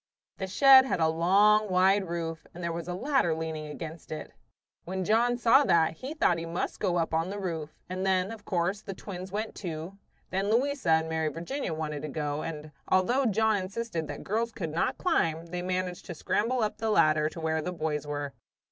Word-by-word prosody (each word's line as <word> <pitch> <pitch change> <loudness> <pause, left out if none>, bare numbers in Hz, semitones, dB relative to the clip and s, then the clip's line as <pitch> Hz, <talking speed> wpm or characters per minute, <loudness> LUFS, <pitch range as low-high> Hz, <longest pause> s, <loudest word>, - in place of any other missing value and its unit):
The 190 - -2
shed 265 +6 +7
had 260 - -1
a 160 - +4
long, 200 +6 +4
wide 190 +1 +3
roof, 165 -1 -4
and 175 - -7
there 170 - -1
was 165 0 -5
a 180 - -3
ladder 260 - +1
leaning 160 -1 -4
against 160 +2 -8
it. 155 - -6 0.5
When 185 +1 -3
John 235 +4 +3
saw 245 +4 +5
that, 165 -4 +3
he 275 - -6
thought 175 - +2
he 165 - -5
must 170 +2 -3
go 175 -1 +1
up 165 -1 -1
on 165 +2 +1
the 200 - -4
roof; 165 -6 -3 0.2
and 185 +1 -4
then, 190 +1 +1
of 220 -2 -9
course, 190 +2 -1
the 195 -3 -7
twins 185 -1 -7
went, 215 +2 -3
too. 175 +2 -6 0.3
Then 195 +2 0
Louisa 265 -1 +1
and 160 0 +4
Mary 160 -1 -1
Virginia 170 - -3
wanted 150 -2 -4
to 155 - -4
go, 145 0 -2
and 155 -2 -6 0.2
although 240 +8 +3
John 220 0 +2
insisted 185 -3 -4
that - - -7
girls 230 +3 -1
could 185 -9 -5
not 165 - 0
climb, 165 - +1
they 175 +1 -5
managed 180 0 -3
to 175 - -6
scramble 230 +8 0
up 215 0 -2
the 225 -1 -1
ladder 155 -6 +4
to 165 - -9
where 160 0 0
the 180 - -3
boys 155 -3 -3
were. 145 -1 -4
180 Hz, 210 wpm, -28 LUFS, 160-210 Hz, 0.5 s, shed